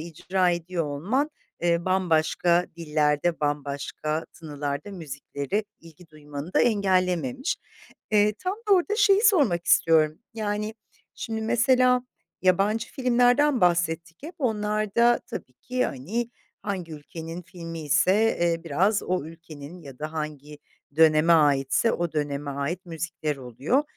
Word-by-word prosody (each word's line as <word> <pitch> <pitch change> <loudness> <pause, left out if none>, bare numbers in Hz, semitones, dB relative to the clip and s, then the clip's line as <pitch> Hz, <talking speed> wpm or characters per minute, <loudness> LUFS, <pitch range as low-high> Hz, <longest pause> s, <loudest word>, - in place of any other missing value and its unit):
icra 175 +3 0
ediyor 175 0 -2
olman, 200 - -1 0.3
eee, 170 0 +1
bambaşka 175 -1 +2
dillerde, 155 0 0
bambaşka 145 +2 -2
tınılarda 145 +1 -5
müziklere 155 +2 -4 0.2
ilgi 165 +1 -16
duymanı 150 +2 -8
da - - +5
engellememiş. 200 - +1 0.5
Eee, 210 0 +4
tam 370 +1 -2
da - - +5
orda 380 +4 +1
şeyi 400 -3 +5
sormak 275 - +3
istiyorum. 155 -1 +4 0.2
Yani, 210 0 -2 0.4
şimdi, 220 -1 -4
mesela, 250 +2 +3 0.4
yabancı 200 +5 +2
filmlerden 250 +2 +3
bahsettik 170 -1 +1
hep. 325 +5 -8
Onlarda 215 -1 +1
tabii - - -7
ki, 250 0 -2
hani, 215 - -3 0.3
hangi 185 -5 -4
ülkenin 165 +3 -8
filmiyse, 165 -2 0 0.3
eee, 170 -1 +1
biraz 190 +7 +1
o 180 -5 -1
ülkenin 165 0 -11
ya 135 -4 -11
da 155 +1 -5
hangi 150 -1 -6 0.4
döneme 160 +1 +5
aitse 145 - +3
o 170 -2 -2
döneme 145 -1 -2
ait 150 +7 -3
müzikler 160 -2 -4
oluyor. 135 - 0
170 Hz, 120 wpm, -25 LUFS, 155-215 Hz, 0.5 s, da